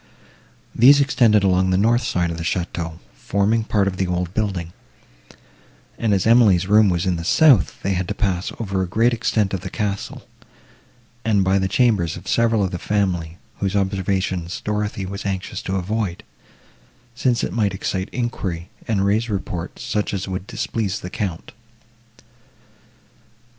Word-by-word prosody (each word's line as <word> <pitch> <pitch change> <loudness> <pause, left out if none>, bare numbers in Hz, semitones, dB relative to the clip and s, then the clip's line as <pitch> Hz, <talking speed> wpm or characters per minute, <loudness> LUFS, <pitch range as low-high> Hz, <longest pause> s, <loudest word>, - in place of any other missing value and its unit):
These 140 +5 +7
extended 120 -7 +3
along 95 -1 +3
the 95 - +2
north 115 +5 +3
side 90 -7 -1
of 85 - -5
the - - -4
château, 85 -1 -3 0.2
forming 100 - 0
part 105 -3 +1
of 95 -1 -2
the 95 - 0
old 90 0 -2
building; 95 -6 -2 1.2
and, 115 - -1
as 95 -3 +2
Emily's 110 -6 +5
room 105 +1 +5
was 90 +1 0
in 90 -2 0
the 85 - -5
south, 135 - +4
they 95 - 0
had 90 -1 -2
to - - -3
pass 95 -4 -1
over 100 -4 -2
a 95 - -1
great 115 +7 +2
extent 110 -3 0
of 95 - -2
the - - -6
castle, 100 -3 -4 1.0
and 105 -3 +2
by 95 +1 +2
the 95 - 0
chambers 100 -7 +1
of 90 - -12
several 115 -3 +2
of 95 - -1
the 90 - -4
family, 90 -5 -1 0.2
whose 100 0 -1
observations 95 -2 -1
Dorothée 105 -2 -2
was 100 +1 -6
anxious 95 -2 -3
to 95 - -3
avoid, 95 -1 -2 0.9
since 120 0 0
it - - -2
might 105 -4 0
excite 95 0 -3
enquiry, 95 -8 -3 0.2
and 100 -3 +1
raise 110 +4 +1
reports, 90 -4 -4
such 105 -1 -1
as 95 - -4
would 95 0 -5
displease 110 -4 -3
the 90 - -7
Count. 90 -5 -4
100 Hz, 165 wpm, -21 LUFS, 90-110 Hz, 1.2 s, These